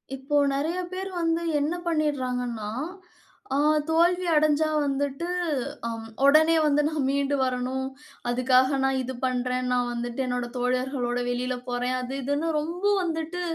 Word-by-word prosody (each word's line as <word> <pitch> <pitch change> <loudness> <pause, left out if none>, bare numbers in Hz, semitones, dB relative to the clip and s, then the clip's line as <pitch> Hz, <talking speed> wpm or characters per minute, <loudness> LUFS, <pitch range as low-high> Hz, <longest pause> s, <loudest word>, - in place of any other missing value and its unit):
இப்போ 270 +2 -3 0.2
நெறய 315 +6 -1
பேர் 380 +1 -4
வந்து 330 0 +1 0.2
என்ன 300 +4 0
பண்ணிடுறாங்கன்னா, 250 -8 -1 0.9
அ - - +2 0.3
தோல்வி 345 +3 +3
அடைஞ்சா 305 0 +3 0.2
வந்துட்டு 280 +3 -1 0.6
அ - - -1 0.4
ஒடனே 315 +3 +6
வந்து 295 0 +3
"நான் 305 -4 -1
மீண்டு 280 +1 +1
வரணும். 255 +1 -1 0.4
அதுக்காக 255 +2 +3
நான் 270 0 +2
இது 260 +1 -4
பண்றேன், 250 0 -1
நான் 245 -1 +1
வந்துட்டு 240 +1 -4
என்னோட 245 -1 -1
தோழர்களோட 250 0 0
வெளியில 250 +1 -1
போறேன்" 245 +1 -1
அது 250 +1 -5
இதுன்னு 285 +5 0
ரொம்ப 340 +5 -4 0.2
வந்துட்டு 330 +1 -3
270 Hz, 135 wpm, -26 LUFS, 250-310 Hz, 0.9 s, ஒடனே